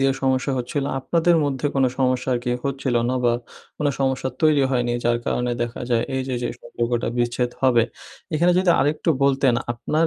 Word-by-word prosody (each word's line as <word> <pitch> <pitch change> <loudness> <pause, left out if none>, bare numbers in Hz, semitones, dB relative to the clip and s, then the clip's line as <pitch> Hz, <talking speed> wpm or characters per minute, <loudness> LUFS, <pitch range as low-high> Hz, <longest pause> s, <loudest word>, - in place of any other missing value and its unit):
দিয়ে 135 0 +3
সমস্যা 130 +1 +1
হচ্ছিলো। 135 +3 -2
আপনাদের 170 +5 +2
মধ্যে 140 -1 -1
কোন 135 -1 +3
সমস্যা 130 0 +1
আর - - 0
কি 125 - -1 0.2
হচ্ছিল 135 -2 -2 0.2
নবা 125 -2 +1 0.5
কোন 150 - 0
সমস্যা 130 -1 0
তৈরি 155 -3 +4
হয়নি 120 -2 0
যার 120 0 +2
কারণে 125 0 0
দেখা 120 0 -5
যায় 115 -1 +3
এই 130 - 0
যে, 130 - -1
যে 120 - -1
সম্পর্কটা 120 0 -2
বিচ্ছেদ 120 +1 0
হবে। 120 -3 +5 0.5
এখানে 175 +3 +3
যদি 185 -1 +3
আরেকটু 150 +3 0
বলতেন 135 -2 +3 0.2
আপনার 155 +7 0
130 Hz, 180 wpm, -22 LUFS, 120-140 Hz, 0.5 s, হবে